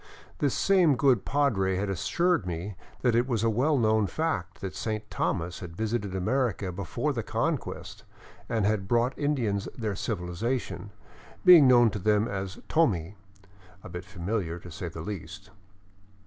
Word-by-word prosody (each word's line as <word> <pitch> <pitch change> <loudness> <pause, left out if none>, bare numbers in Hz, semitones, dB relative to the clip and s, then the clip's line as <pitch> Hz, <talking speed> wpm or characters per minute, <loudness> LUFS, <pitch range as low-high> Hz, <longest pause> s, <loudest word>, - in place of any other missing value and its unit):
This 145 -3 +1
same 180 -7 +4
good 125 -5 +3
padre 110 -10 +1
had 100 +2 -1
assured 115 - +1
me 90 +4 -4 0.3
that 125 -2 +3
it 120 +2 +2
was 115 -4 0
a 115 - +3
well 140 +7 +2
known 110 -3 +3
fact 100 - -2
that 95 -2 -5
Saint 110 -1 -3
Thomas 90 0 -2
had 85 -2 -9
visited 110 -3 -2
America 100 -1 0
before 90 -4 -2
the - - -2
Conquest - - -3 0.5
and 110 -4 +1
had 105 -2 0
brought 120 +3 +2
the - - -10
Indians 115 -9 0
their 110 -4 -2
civil 90 -4 -3
ization, 115 +3 -3 0.6
being 175 -7 +9
known 120 -3 +6
to 105 - -4
them 105 +2 +2
as 95 -1 -4
" - - -31
Tomi 100 - +1 0.2
" 100 0 -27
— 95 -1 -24
a - - -9
bit 90 +1 -6
familiar, 90 -1 -3
to 90 0 -11
say 85 +2 -5
the 80 -1 -7
least. 100 +1 -7
105 Hz, 175 wpm, -28 LUFS, 95-120 Hz, 0.6 s, being